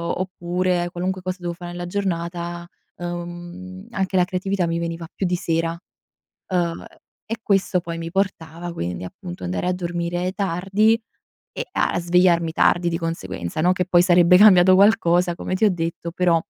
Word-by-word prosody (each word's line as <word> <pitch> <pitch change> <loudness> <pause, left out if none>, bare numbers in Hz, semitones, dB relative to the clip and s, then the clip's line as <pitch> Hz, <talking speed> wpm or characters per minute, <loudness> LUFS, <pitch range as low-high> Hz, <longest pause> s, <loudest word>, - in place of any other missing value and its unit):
oppure 180 -1 -1
qualunque 185 +1 -3
cosa 185 0 -3
devo 175 -1 -3
fare 175 0 -8
nella 175 0 -5
giornata, 175 -2 -3 0.3
uhm, 175 +3 -7
anche 190 -1 -2
la 180 - +4
creatività 185 -1 -1
mi 165 0 -1
veniva 165 0 -4
più 195 - -2
di 180 0 +1
sera, 165 0 -1 0.7
ehm 175 -3 -1 0.4
e 225 +1 -4
questo 195 -3 +1
poi 170 -1 -6
mi 165 0 -5
portava 175 -3 -2
quindi, 90 - -4
appunto, 90 0 -9
andare 90 - -2
a 180 - +2
dormire 175 0 -2
tardi 200 +4 +1 0.5
e - - -4
a - - +1
svegliarmi 170 -1 +3
tardi 175 +1 +3
di 165 - -1
conseguenza, 95 - -4
no, 180 +3 +4
che 180 0 0
poi 175 -1 +5
sarebbe 180 0 +6
cambiato 185 -3 +7
qualcosa 180 -4 +4
come 185 - -4
ti 220 - +1
ho 210 - +5
detto, 170 -1 -3
però, 175 -2 +3
175 Hz, 165 wpm, -22 LUFS, 170-185 Hz, 0.7 s, cambiato